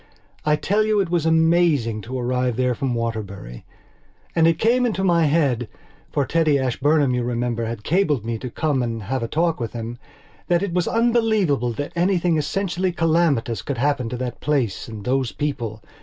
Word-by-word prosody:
I 150 0 +3
tell 205 +7 +1
you 215 -1 +2
it 185 -4 0
was 170 -2 +1
amazing 160 -9 +3
to 130 +3 -4
arrive 125 0 0
there 125 +1 +1
from 125 0 -2
Waterbury. 100 - -5 0.7
And 165 -1 +4
it 165 -1 +3
came 240 +5 +3
into 215 -5 0
my 170 -4 +3
headfor 140 -1 -2
Teddy 160 -2 +2
Ashburnham, 140 +2 +2
you 125 - 0
remember, 120 -1 -1
had 115 -1 -5
cabled 155 - +1
to - - -14
me 115 -1 -3
to 125 - -5
"come 145 +1 0
and 115 -3 -3
have 130 +6 -2
a 115 - -2
talk" 165 +3 0
with 115 -2 -4
himthat 120 - -4
it 195 -4 -2
was 180 -1 +1
unbelievable 220 - +2
that 145 +8 -5
anything 175 -2 +2
essentially 185 +3 -1
calamitous 160 - +1
could 140 - -4
happen 130 -2 0
to 125 - -4
that 125 -1 -5
place 135 -9 -1
and 110 -3 -8
those 130 -1 0
people. 115 -8 -4
140 Hz, 180 wpm, -22 LUFS, 120-170 Hz, 0.7 s, And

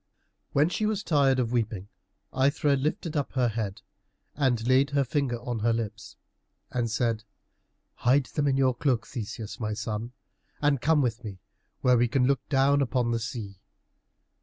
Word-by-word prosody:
When 145 +2 +3
she 210 +4 -1
was 215 -2 -1
tired 140 -4 +3
of 120 -3 0
weeping 110 -5 -1 0.5
Aithra 140 +2 +2
lifted 155 +4 -2
up 145 -2 -1
her 125 -3 +2
head 110 -1 -4 0.5
and 120 -5 0
laid 130 +2 +4
her 140 0 +2
finger 130 -3 -1
on 120 -2 -4
her 115 +2 +2
lips, 110 -2 -5 0.6
and 120 -2 -1
said, 115 -1 0 0.7
"Hide 130 +3 +3
them 145 +1 -1
in 135 -1 +2
your 130 -1 +3
cloak, 120 -3 0
Theseus, 110 -2 -6
my 110 -2 -2
son, 110 +2 -4 0.5
and 145 -3 +2
come 155 -2 +3
with 120 -1 -2
me 100 -4 -7 0.4
where 125 -2 +4
we 120 - +3
can 125 +1 +2
look 135 -1 +2
down 140 0 +3
upon 125 -3 0
the 115 - 0
sea." 110 -4 -6
125 Hz, 165 wpm, -27 LUFS, 115-140 Hz, 0.7 s, laid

